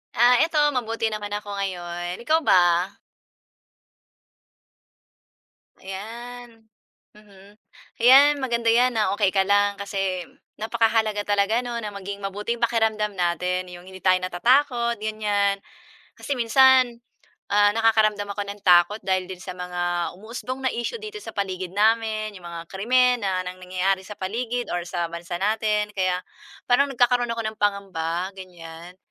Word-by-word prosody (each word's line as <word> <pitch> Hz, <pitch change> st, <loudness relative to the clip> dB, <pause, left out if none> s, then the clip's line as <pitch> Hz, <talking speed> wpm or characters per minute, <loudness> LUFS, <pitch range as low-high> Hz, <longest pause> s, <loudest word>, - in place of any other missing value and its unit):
Ah, 245 Hz, +1 st, +5 dB
ito 325 Hz, -1 st, -3 dB, 0.2 s
mabuti 230 Hz, -3 st, -2 dB
naman 205 Hz, -1 st, -5 dB
ako 205 Hz, 0 st, -6 dB
ngayon. 175 Hz, -2 st, -4 dB
Ikaw 315 Hz, +3 st, +3 dB
ba? 180 Hz, 0 st, +3 dB, 2.9 s
Ayan. 230 Hz, +4 st, -9 dB, 0.5 s
Mhm. 205 Hz, -1 st, -18 dB, 0.5 s
‘Yan, 275 Hz, +4 st, +7 dB
maganda 235 Hz, -3 st, -1 dB
yan 245 Hz, +2 st, +4 dB
na 210 Hz, -4 st, +1 dB
okey 205 Hz, -1 st, +2 dB
ka 195 Hz, -, +3 dB
lang 205 Hz, 0 st, +2 dB
kasi 195 Hz, -3 st, -3 dB, 0.3 s
napakahalaga 220 Hz, -1 st, +1 dB
talaga 205 Hz, +3 st, +1 dB
'no, 240 Hz, -1 st, -5 dB
na 210 Hz, -, -4 dB
maging 200 Hz, 0 st, -6 dB
mabuti 205 Hz, +3 st, -3 dB
yung -, -, -18 dB
pakiramdam 220 Hz, -2 st, 0 dB
natin, 180 Hz, 0 st, -1 dB
'yong 175 Hz, 0 st, -11 dB
hindi 190 Hz, 0 st, -12 dB
tayo 185 Hz, -1 st, +4 dB
natatakot 235 Hz, +5 st, +1 dB
ganiyan 205 Hz, -2 st, 0 dB, 0.5 s
kasi 285 Hz, -, -4 dB
minsan, 255 Hz, 0 st, +5 dB, 0.6 s
ah, 205 Hz, 0 st, +5 dB
nakakaramdam 215 Hz, -2 st, +2 dB
ako 205 Hz, -, -4 dB
ng 205 Hz, 0 st, -8 dB
takot 180 Hz, +3 st, +5 dB
dahil 185 Hz, -1 st, 0 dB
din 185 Hz, -, -6 dB
sa 185 Hz, -, -7 dB
mga 175 Hz, -1 st, -3 dB
umuusbong 250 Hz, +5 st, -7 dB
na -, -, +3 dB
issue 240 Hz, -, -3 dB
dito 425 Hz, 0 st, -7 dB
sa -, -, -9 dB
paligid 185 Hz, -2 st, -3 dB
namin, 215 Hz, 0 st, +1 dB
'yong 185 Hz, -3 st, -13 dB
mga 170 Hz, -1 st, -6 dB
krimen 250 Hz, +5 st, +2 dB
na 190 Hz, -2 st, -1 dB
nang 180 Hz, 0 st, -6 dB
nangyayari 185 Hz, +1 st, -1 dB
sa 210 Hz, -, -9 dB
paligid 235 Hz, +5 st, -3 dB
or 175 Hz, -, -1 dB
sa 175 Hz, -1 st, -2 dB
bansa 170 Hz, +1 st, -6 dB
natin 210 Hz, +1 st, 0 dB
kaya 185 Hz, -2 st, 0 dB, 0.5 s
parang 275 Hz, +3 st, +4 dB
nagkakaroon 245 Hz, -1 st, +2 dB
ako 230 Hz, 0 st, -2 dB
ng 215 Hz, 0 st, -4 dB
pangamba 185 Hz, -3 st, -1 dB
ganiyan. 175 Hz, -1 st, -11 dB
205 Hz, 140 wpm, -24 LUFS, 185-230 Hz, 2.9 s, Yan